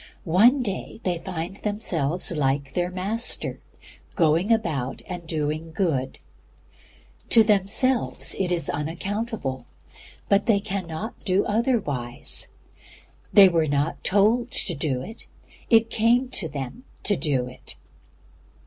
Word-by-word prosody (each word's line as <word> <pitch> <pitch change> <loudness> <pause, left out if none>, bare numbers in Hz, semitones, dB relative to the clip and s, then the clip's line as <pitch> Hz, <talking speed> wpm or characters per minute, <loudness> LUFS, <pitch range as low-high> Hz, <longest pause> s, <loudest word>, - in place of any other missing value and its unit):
One 230 - +4
day 205 0 -5
they 175 -2 -1
find 180 +1 -5
themselves 180 -8 0
like 140 -3 -1
their 175 0 0
Master, 200 +6 -1 0.6
going 165 +4 +2
about 155 - -1
and 175 -2 -7
doing 155 +1 -3
good. 160 -7 -1 1.1
To 225 - +7
themselves 215 +5 +2
it 185 -2 0
is 175 -1 0
unaccountable, 165 - -3 0.6
but 200 +4 +2
they 215 -4 +4
cannot 200 0 -5
do 190 +1 +1
otherwise. 205 - -1 0.8
They 200 -2 +9
were 165 -3 +1
not 145 +2 -1
told 220 +5 +3
to 175 - -1
do 135 -4 -2
it, 220 - -10 0.4
it 225 -1 +4
came 240 +3 +2
to 165 -9 0
them 140 - -6 0.2
to 205 - +2
do 140 -8 0
it. 125 0 -10
180 Hz, 120 wpm, -24 LUFS, 155-215 Hz, 1.1 s, They